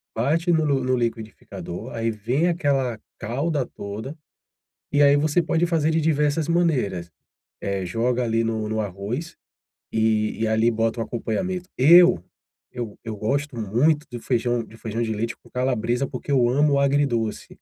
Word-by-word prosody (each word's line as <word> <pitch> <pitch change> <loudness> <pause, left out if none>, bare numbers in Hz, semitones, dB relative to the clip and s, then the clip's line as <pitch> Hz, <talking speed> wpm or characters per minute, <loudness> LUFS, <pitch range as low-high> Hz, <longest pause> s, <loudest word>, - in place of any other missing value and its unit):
bate 160 +9 +1
no 160 -2 +3
no 140 -3 +1
no 130 0 +1
liquidificador, 115 -6 -5
aí 115 0 -1
vem 120 - 0
aquela 135 -9 0 0.2
calda 140 +5 -1
toda, 110 +10 -7 0.8
e 145 0 +4
aí 140 0 +6
você 155 +3 +2
pode 165 +2 +1
fazer 160 -2 +1
de 160 - +2
diversas 150 0 +1
maneiras, 130 - 0 0.5
eh, 100 -2 -2
joga 120 +6 0
ali 115 0 +1
no 110 -1 -2
no 110 0 -1
arroz, 105 - -5 0.6
e 110 -1 +1
e 115 - +1
ali 110 +2 +3
bota 115 +1 -1
um 115 - 0
acompanhamento. 180 - -3
Eu, 160 - +7 0.5
eu 120 -4 -6
eu 110 -2 -5
gosto 140 +6 -1
muito 145 +9 +1
de 120 - -5
feijão 120 -1 0
de 110 - -15
feijão 115 +1 -3
de 110 -1 -1
leite 115 +2 -3
com - - -22
calabresa, 125 0 0
porque 140 +1 -5
eu 125 -3 +4
amo 140 +2 +3
agridoce. 135 -6 0
125 Hz, 160 wpm, -23 LUFS, 110-145 Hz, 0.8 s, Eu